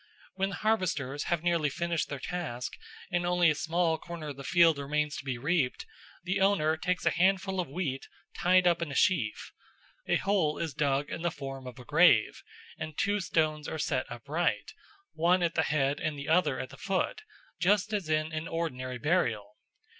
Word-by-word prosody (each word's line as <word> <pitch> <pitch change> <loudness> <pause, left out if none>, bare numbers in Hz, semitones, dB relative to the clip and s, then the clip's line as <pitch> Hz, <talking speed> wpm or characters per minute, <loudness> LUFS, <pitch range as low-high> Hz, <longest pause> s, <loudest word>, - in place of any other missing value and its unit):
When 195 0 -1
the 195 - -5
harvesters 165 -10 -1
have 175 -2 -1
nearly 170 -4 +2
finished 170 +3 -2
their 140 - -4
task 135 -5 -4 0.4
and 175 0 +1
only 175 -2 +3
a - - +2
small 165 +1 0
corner 170 -3 -7
of 145 - -6
the 140 - -8
field 165 -1 +4
remains 150 +1 -1
to - - -6
be 130 -3 -3
reaped, 140 0 0 0.4
the 185 +2 -1
owner 190 -6 +3
takes 180 +3 -2
a - - +4
handful 190 +1 +1
of 175 - -1
wheat 140 -4 -3 0.3
tied 185 +1 +4
up 170 -1 +3
in 170 - -2
a - - -5
sheaf. 150 - +1 0.6
A - - +3
hole 190 -7 +1
is 165 -3 -3
dug 140 0 0
in - - -4
the 175 - +1
form 135 -3 -7
of 125 - -9
a 125 - -11
grave, 150 -7 +4 0.4
and 155 -1 -6
two 205 +1 +1
stones 155 -4 0
are - - -4
set 145 -3 -1
upright, 145 +9 -2 0.4
one 175 +2 +3
at 170 -1 +1
the - - +2
head 145 -1 +1
and 155 -2 -2
the 140 - -6
other 180 +3 +3
at - - -5
the - - -12
foot, 435 - -1 0.4
just 205 +4 +2
as 195 -6 -2
in 155 0 +1
an 155 +1 -3
ordinary 130 -7 -3
burial. 120 - 0
160 Hz, 190 wpm, -29 LUFS, 140-180 Hz, 0.6 s, field